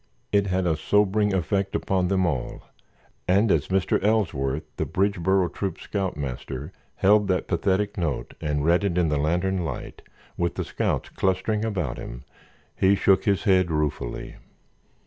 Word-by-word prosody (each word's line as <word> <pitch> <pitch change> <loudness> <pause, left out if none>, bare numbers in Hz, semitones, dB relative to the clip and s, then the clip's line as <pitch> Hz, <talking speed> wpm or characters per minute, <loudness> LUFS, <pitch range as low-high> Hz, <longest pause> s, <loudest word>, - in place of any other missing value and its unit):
It 100 -1 +3
had 95 0 0
a 80 -2 +2
sobering 105 +5 +2
effect 95 +2 0
upon 95 -2 0
them 95 0 +2
all, 70 -8 -3 0.6
and 100 +3 +3
as - - +2
Mr. 95 0 +1
Ellsworth, 80 -10 +1
the - - -1
Bridgeboro 95 -2 +1
Troop's 95 -3 -4
scoutmaster, 70 - -4 0.2
held 105 +1 +4
that 95 -1 0
pathetic 95 +3 0
note 75 -7 -2
and 75 -2 -1
read 85 +4 +3
it 95 -3 0
in 85 -3 +2
the 75 -1 +1
lantern 90 +5 0
light, 80 - -6 0.4
with 85 0 -1
the - - -3
scouts - - -2
clustering 95 +3 0
about 90 - -2
him, - - -8 0.5
he 95 +1 +4
shook 95 +3 +3
his 100 -5 +2
head 95 -3 +3
ruefully. 75 -6 -3
95 Hz, 150 wpm, -25 LUFS, 80-100 Hz, 0.6 s, held